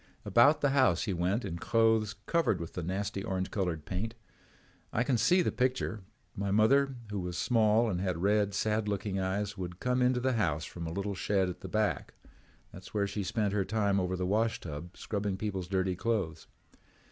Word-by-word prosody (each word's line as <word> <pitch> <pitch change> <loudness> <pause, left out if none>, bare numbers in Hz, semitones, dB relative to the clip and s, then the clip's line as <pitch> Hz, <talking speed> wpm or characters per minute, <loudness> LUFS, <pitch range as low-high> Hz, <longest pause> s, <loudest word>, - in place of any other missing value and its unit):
"About 130 +6 +5
the 145 - +3
house 130 -3 +3
he 100 - -1
went 90 +7 0
in 85 -3 -4
the - - -13
clothes 110 -2 +2
covered 170 -5 +1
with 85 0 -6
the 90 - -4
nasty 95 +3 -3
orange 95 -3 -2
colored 90 -6 -2
paint. 110 +5 -3 0.8
I 125 - +1
can 130 0 +1
see 180 +10 +4
the - - 0
picture. 125 -4 -1 0.3
My 100 0 -2
mother, 135 +7 +4 0.2
who 105 - -2
was 90 -1 -4
small 110 +1 +3
and 90 -4 -1
had 90 -3 -1
red, 100 +2 +2
sad 110 +1 0
looking 100 -1 -2
eyes, 100 +2 -2
would 90 -1 -5
come 125 0 +1
into 125 0 +3
the 130 +1 +1
house 80 -9 0
from 85 -1 -6
a - - -4
little 100 +3 -2
shed 95 0 +1
at 90 - -7
the - - -6
back. 105 -8 -1 0.6
That's 90 +3 -12
where 100 -1 +2
she 100 +1 -3
spent 100 +1 -1
her 100 -2 +2
time 100 0 +1
over 90 0 -1
the 90 0 -2
washtub 90 -6 -2
scrubbing 100 -2 -2
people's 95 -3 -3
dirty 95 -1 0
clothes. 95 -6 -2
100 Hz, 195 wpm, -31 LUFS, 95-110 Hz, 0.8 s, About